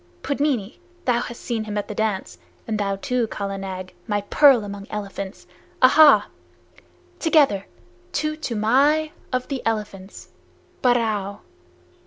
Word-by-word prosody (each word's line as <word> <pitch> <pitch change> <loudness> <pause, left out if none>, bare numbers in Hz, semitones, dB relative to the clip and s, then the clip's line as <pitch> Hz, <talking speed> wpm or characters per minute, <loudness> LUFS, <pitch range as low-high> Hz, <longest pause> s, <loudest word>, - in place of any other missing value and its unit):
Pudmini, 275 -7 -1 0.3
thou 245 -2 +2
hast 235 -1 -6
seen 225 -2 -3
him 210 -1 -4
at 205 - -2
the - - -5
dance, 215 -3 -2 0.3
and 215 -1 -2
thou 195 -1 0
too, 250 +2 -1
Kala 200 -2 -4
Nag, 185 -1 -6
my 205 -2 0
pearl 275 -7 +6
among 200 0 -7
elephants! 200 -2 -6 0.3
ahaa! 290 +3 +7 1.0
Together! 290 - +3 0.5
To 305 0 -1
Toomai 285 +4 +2 0.2
of 255 -1 -1
the 275 -3 -3
Elephants. 210 -3 -4 0.5
Barrao!" 215 -5 +1
220 Hz, 125 wpm, -23 LUFS, 200-265 Hz, 1.0 s, ahaa